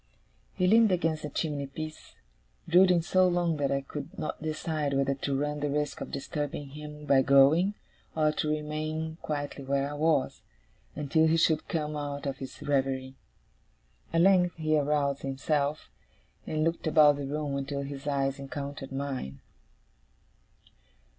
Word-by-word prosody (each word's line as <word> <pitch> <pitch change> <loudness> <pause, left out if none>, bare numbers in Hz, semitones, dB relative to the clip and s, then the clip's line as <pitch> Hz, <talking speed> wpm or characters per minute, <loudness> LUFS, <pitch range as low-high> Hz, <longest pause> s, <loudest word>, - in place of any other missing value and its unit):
He 180 - +1
leaned 220 +2 +5
against 165 -3 0
the 150 - -5
chimney 145 -2 -2
piece, 155 +3 -8 0.5
brooding 180 0 +5
so 185 +2 +3
long 175 -2 +1
that 140 -2 0
I 140 0 +1
could 145 +2 -8
not 155 - -4
decide 155 -2 -2
whether 135 0 +2
to 135 0 -2
run 150 +1 -2
the 145 0 -1
risk 150 0 -2
of - - -5
disturbing 145 0 -4
him 150 +1 -9
by 135 -2 +5
going, 145 +9 +5 0.4
or 155 -1 +3
to 155 0 -2
remain 155 +1 -3
quietly 145 -2 -4
where 140 +1 0
I 145 - -6
was, 150 -1 +1 0.5
until 160 +2 +2
he 160 +1 +3
should 160 -1 +2
come 150 -2 -2
out 145 -1 -4
of 135 -1 -3
his 135 - -8
reverie. 135 -2 0 1.0
At 165 - +3
length 180 -2 +4
he 155 -1 +1
aroused 145 -1 +1
himself, 140 +2 -1 0.6
and 155 0 0
looked 165 0 -1
about 150 -2 +6
the 140 -1 -4
room 145 0 -2
until 140 0 -3
his 140 +1 -7
eyes 135 -1 0
encountered 140 0 -6
mine. 135 - -4
150 Hz, 155 wpm, -29 LUFS, 140-160 Hz, 1.0 s, about